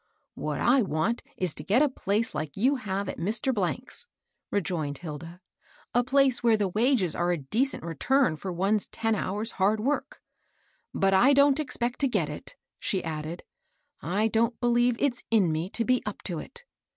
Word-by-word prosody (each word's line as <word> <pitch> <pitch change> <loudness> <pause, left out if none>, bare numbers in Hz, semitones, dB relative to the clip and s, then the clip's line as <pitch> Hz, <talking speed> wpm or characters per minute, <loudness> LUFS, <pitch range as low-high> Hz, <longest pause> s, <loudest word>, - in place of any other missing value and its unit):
" - - -46
What 150 -1 -3
I 255 +2 +4
want 195 +4 0 0.2
is 180 -8 -1
to - - -8
get 240 +9 +3
a - - +4
place 220 -4 -1
like 150 +1 -4
you 265 +7 +3
have 200 -4 -3
at - - -5
Mr. 215 +9 0
^'s," 235 - -3 0.4
rejoined 160 -7 -2
Hilda, 165 +3 -8
— - - -32
" - - -31
a 245 - +3
place 265 0 +3
where 230 -2 +4
the 205 -2 0
wages 215 - +2
are 175 0 +1
a 175 - +1
decent 220 - -1
return 170 - +1
for 185 +4 -5
one's 195 +4 0
ten 225 0 -1
hours' 210 +2 -2
hard 210 +3 +3
work; 290 - -2 0.7
but 195 0 +2
I 245 +9 +6
don't 280 +1 +5
expect 250 -4 -2
to 280 - +3
get 255 - 0
it," - - -8 0.2
she 190 -3 -1
added. 160 +1 -5 0.6
I 195 +8 +1
don't 230 +2 +1
believe 240 0 +3
it's 250 -4 0
in 205 -7 +3
me 160 +4 -2
to 230 +2 -1
be 255 +1 +2
up 210 -1 -6
to 170 -4 -3
it. 475 - -8
215 Hz, 190 wpm, -27 LUFS, 175-245 Hz, 0.7 s, I